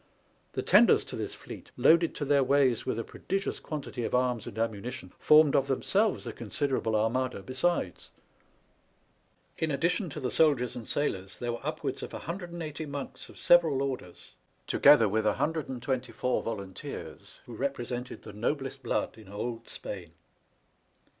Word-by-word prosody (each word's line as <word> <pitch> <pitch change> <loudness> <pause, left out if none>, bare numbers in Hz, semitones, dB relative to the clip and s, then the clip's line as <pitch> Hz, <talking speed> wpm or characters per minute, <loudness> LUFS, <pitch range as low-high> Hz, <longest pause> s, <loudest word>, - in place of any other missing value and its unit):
The - - -2
tenders - - +6
to - - -7
this - - -4
fleet, - - -10
loaded 170 0 +5
to 145 - -3
their 140 -1 +4
ways 130 -3 +2
with - - 0
a 115 - -2
prodigious 195 +10 -3
quantity 145 -5 -5
of - - 0
arms 125 -3 +1
and 100 - -8
ammunition, 115 -2 -3
formed 150 -1 +6
of 135 - +3
themselves 195 +8 +1
a 115 - -5
consider 130 +4 -1
able 110 -1 -1
armada 115 0 0
besides. 130 - -1 1.5
In 160 - 0
addition 170 +6 0
to 150 - -6
the 130 -3 -2
soldiers 140 -7 +3
and 115 -3 -7
sailors 95 -10 -2
there 120 -1 -2
were 120 - -5
upwards - - -3
of - - -7
180 170 -3 -5
monks 140 -1 -6
of - - -14
several 160 -6 +5
orders, 130 -10 -6 0.3
together 140 -6 +6
with 110 +2 0
124 130 -4 -1
volunteers, 100 -4 -7
who 120 - -10
represented 125 -1 -4
the 105 - -9
noblest 135 +5 -2
blood 115 - -2
in 105 -3 -14
old 115 +3 -5
Spain. 85 -5 -7
130 Hz, 150 wpm, -29 LUFS, 115-150 Hz, 1.5 s, tenders